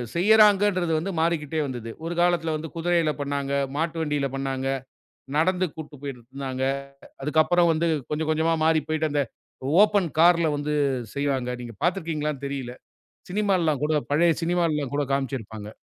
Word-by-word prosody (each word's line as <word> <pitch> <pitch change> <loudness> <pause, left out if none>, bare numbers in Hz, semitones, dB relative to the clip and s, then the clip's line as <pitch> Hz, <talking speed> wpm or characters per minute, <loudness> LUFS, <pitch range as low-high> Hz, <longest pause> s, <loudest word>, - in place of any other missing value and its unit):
செய்யறாங்கன்றது 205 -2 +4
வந்து 190 +5 -3
மாறிக்கிட்டே 160 -2 0
வந்தது. 120 -4 -5
ஒரு 170 - -2
காலத்தில 170 -2 +2
வந்து 155 +1 -5
குதிரையில 165 -1 +1
பண்ணாங்க, 140 -1 -2 0.2
மாட்டு 165 +1 -1
வண்டியில 150 -3 0
பண்ணாங்க. 135 -1 -2 0.7
நடந்து 180 +3 +2
கூட்டுப் 150 -3 -9
போய்ட்டு 135 -4 -6
இருந்தாங்க. 130 -1 -4 0.6
அதுக்கப்புறம் 160 +4 +3
வந்து 165 +2 0 0.2
கொஞ்சம் 155 +1 -1
கொஞ்சமா 160 +1 +2
மாறி 160 -1 +4
போய்ட்டு 155 0 0
அந்த, 145 -1 +2 0.6
ஓப்பன் 205 -4 +2
கார்ல 170 -1 +5
வந்து 150 +1 -2 0.4
செய்வாங்க. 140 -3 -1
நீங்க 120 -2 -8
பார்த்து 175 +3 +2
இருக்கீங்களான்னு 150 -3 -3
தெரியல. 130 -3 -5 0.6
சினிமால்லாம் 185 -8 +1
கூட 155 +1 +1 0.2
பழைய 165 +3 +4
சினிமால்லாம் 165 -5 0
கூட 145 - +1
காமிச்சுருப்பாங்க. 115 -6 -3
155 Hz, 140 wpm, -25 LUFS, 140-170 Hz, 0.7 s, கார்ல